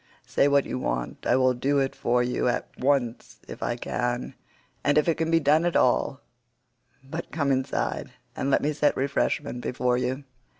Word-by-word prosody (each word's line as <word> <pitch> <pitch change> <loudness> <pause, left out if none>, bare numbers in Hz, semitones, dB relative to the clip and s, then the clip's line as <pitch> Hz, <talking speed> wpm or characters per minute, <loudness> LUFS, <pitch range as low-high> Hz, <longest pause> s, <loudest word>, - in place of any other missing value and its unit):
Say 140 - +2
what 140 -1 +3
you - - -3
want; - - -3
I - - +4
will 130 0 +4
do 135 +3 0
it 135 -1 0
for 120 +1 +1
you 125 0 0
at 120 - 0
once 130 -3 0
if - - -9
I 120 - -1
can, 120 +1 -2 0.5
and 145 +1 +3
if 150 - +3
it 165 - +4
can 160 0 -2
be 165 0 +4
done 155 +2 +3
at 175 -1 0
all; 130 +2 +2 0.8
but 160 +5 -6
come 140 -3 0
inside, 130 0 -1 0.3
and 135 - -1
let - - +2
me 150 +1 +1
set 145 0 +2
refreshment 135 -1 -1
before 125 0 0
you." 130 +3 -2
135 Hz, 185 wpm, -26 LUFS, 125-145 Hz, 0.8 s, I